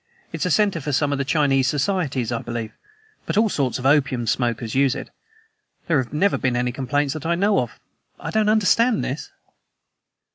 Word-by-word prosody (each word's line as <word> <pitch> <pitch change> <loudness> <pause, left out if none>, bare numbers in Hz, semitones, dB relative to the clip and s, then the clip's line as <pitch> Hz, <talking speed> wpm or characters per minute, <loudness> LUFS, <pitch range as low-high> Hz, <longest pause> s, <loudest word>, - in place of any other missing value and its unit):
It's - - -1
a - - -1
center 200 -6 +2
for 145 - -3
some 145 +2 +1
of 140 - -1
the - - +1
Chinese 140 -2 +2
societies, 145 - -1
I 115 - -1
believe, 115 -2 -5 0.6
but - - -1
all 220 0 +4
sorts 135 - -1
of 130 - -7
opium 135 -4 +2
smokers 115 -1 -1
use 135 -1 +2
it. - - -7 0.7
There 160 -5 +2
have 120 - -8
never 185 +7 +1
been 130 -2 0
any 125 0 0
complaints 140 +2 -1
that 155 - -7
I 170 - +2
know 200 +3 +2
of. 120 -4 -4 0.4
I - - -5
don't 215 -1 +2
understand 220 +2 +3
this." 135 +4 -5
140 Hz, 190 wpm, -22 LUFS, 125-170 Hz, 0.7 s, all